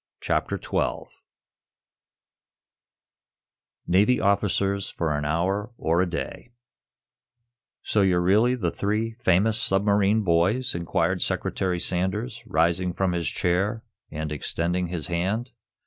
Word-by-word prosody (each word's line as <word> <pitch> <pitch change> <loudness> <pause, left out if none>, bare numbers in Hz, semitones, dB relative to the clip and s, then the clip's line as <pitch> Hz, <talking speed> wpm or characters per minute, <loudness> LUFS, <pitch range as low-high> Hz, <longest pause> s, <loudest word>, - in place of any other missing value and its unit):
CHAPTER - - -1
XII - - -2 2.8
NAVY 105 +8 +3
OFFICERS 100 -1 +1
FOR 80 -3 -2
AN 75 0 -2
HOUR 95 +9 -1
OR 85 +3 +1
A 90 - 0
DAY 85 +7 -5 1.3
"So 105 - +1
you're 95 -2 +3
really 105 +8 +3
the 90 -9 -1
three 105 +3 -1
famous 110 +1 +2
submarine 100 +2 +2
boys?" 95 +8 +2
inquired 85 +1 -1
Secretary 90 -2 -1
Sanders, 105 +8 -2
rising 85 +1 +1
from 95 0 0
his 85 -2 -1
chair 100 +6 0 0.3
and 80 0 -5
extending 85 +4 -1
his 85 -2 -2
hand. 95 +9 -1
95 Hz, 110 wpm, -25 LUFS, 85-105 Hz, 2.8 s, NAVY